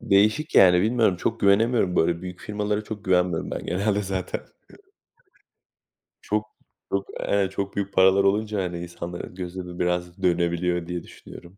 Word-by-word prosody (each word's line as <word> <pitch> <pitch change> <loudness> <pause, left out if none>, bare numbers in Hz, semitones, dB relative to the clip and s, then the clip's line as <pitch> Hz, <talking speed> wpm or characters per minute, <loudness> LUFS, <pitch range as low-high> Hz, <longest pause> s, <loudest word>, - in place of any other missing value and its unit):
Değişik 105 +10 +2
yani 90 -1 +7
bilmiyorum, 110 -4 +2
çok 115 +6 -2
güvenemiyorum. 100 -1 +3
Böyle 85 +2 +2
büyük 90 -1 -7
firmalara 105 0 -2
çok 105 -2 -7
güvenmiyorum 90 -3 +1
ben - - -5
genelde 100 +3 0
zaten. 95 -1 -3 1.8
Çok 105 0 -1 0.5
çok, 100 0 -1
eee, 100 -2 +1
çok 100 0 -4
büyük 100 0 -3
paralar 95 +1 +5
olunca 105 0 +1
hani 85 -1 -4
insanların 85 +1 -7
gözü 90 0 -6
de 90 0 -9
biraz 90 +1 -2
dönebiliyor 85 0 +1
diye 90 -1 -4
düşünüyorum. 85 +3 -13
95 Hz, 145 wpm, -24 LUFS, 90-105 Hz, 1.8 s, yani